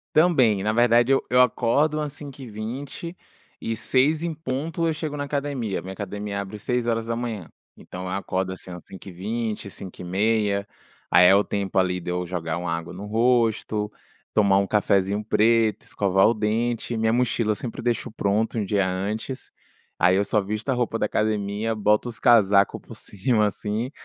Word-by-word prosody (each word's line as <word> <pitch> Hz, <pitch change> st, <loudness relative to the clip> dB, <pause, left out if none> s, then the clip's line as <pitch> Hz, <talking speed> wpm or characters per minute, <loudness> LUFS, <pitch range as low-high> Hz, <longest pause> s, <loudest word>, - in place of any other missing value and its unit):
Também. 135 Hz, -, +4 dB
Na 110 Hz, +1 st, +1 dB
verdade, 120 Hz, +1 st, +4 dB
eu -, -, +2 dB
eu 125 Hz, +1 st, +5 dB
acordo 130 Hz, +5 st, +2 dB
umas 150 Hz, -1 st, -2 dB
5h20 135 Hz, -, -7 dB, 0.5 s
e 115 Hz, -, -2 dB
6h 150 Hz, +7 st, +2 dB
em 170 Hz, -, -1 dB
ponto 155 Hz, +3 st, -3 dB
eu 160 Hz, -, +1 dB
chego 155 Hz, -1 st, -4 dB
na 145 Hz, -, -3 dB
academia, 140 Hz, -7 st, -2 dB
minha 95 Hz, +1 st, -7 dB
academia 100 Hz, 0 st, -4 dB
abre 100 Hz, +2 st, -7 dB
6h, 115 Hz, -3 st, -2 dB, 0.3 s
então 90 Hz, 0 st, -9 dB
eu -, -, -4 dB
acordo, 95 Hz, -1 st, -2 dB
assim, 95 Hz, 0 st, -8 dB
umas 90 Hz, -1 st, -8 dB
5h20, 100 Hz, +3 st, -5 dB
5h30, 100 Hz, +3 st, -1 dB, 0.4 s
aí 90 Hz, 0 st, +7 dB
é 95 Hz, -, +7 dB
o 100 Hz, -, +4 dB
tempo 100 Hz, -2 st, -3 dB
ali 90 Hz, -1 st, +2 dB
de 90 Hz, -, -6 dB
eu 90 Hz, 0 st, -2 dB
jogar 85 Hz, -2 st, -3 dB
uma 90 Hz, -1 st, -3 dB
água 85 Hz, 0 st, -6 dB
no 95 Hz, +3 st, -8 dB
rosto, 110 Hz, -2 st, +1 dB, 0.4 s
tomar 100 Hz, -2 st, +4 dB
um 100 Hz, -, +2 dB
cafezinho 100 Hz, 0 st, +1 dB
preto, 110 Hz, 0 st, +2 dB
escovar 95 Hz, 0 st, +2 dB
o 115 Hz, -, +3 dB
dente, 115 Hz, +2 st, -1 dB
minha 110 Hz, 0 st, +2 dB
mochila 120 Hz, -3 st, +1 dB
sempre 115 Hz, +2 st, -6 dB
deixo 120 Hz, -2 st, -1 dB
pronto 110 Hz, +2 st, 0 dB
um 105 Hz, -, 0 dB
dia 100 Hz, 0 st, +1 dB
antes, 105 Hz, +8 st, -4 dB, 0.5 s
aí 90 Hz, +1 st, +5 dB
eu 100 Hz, +1 st, +2 dB
só 105 Hz, 0 st, +2 dB
visto 105 Hz, +6 st, -4 dB
a -, -, +3 dB
roupa 120 Hz, -2 st, -1 dB
da -, -, 0 dB
academia, 105 Hz, +1 st, -1 dB
boto 105 Hz, +3 st, +2 dB
os 115 Hz, -, -8 dB
casaco 100 Hz, -4 st, +4 dB
por -, -, -12 dB
cima, 105 Hz, +2 st, 0 dB
assim, 105 Hz, +5 st, -2 dB
110 Hz, 170 wpm, -24 LUFS, 100-120 Hz, 0.5 s, aí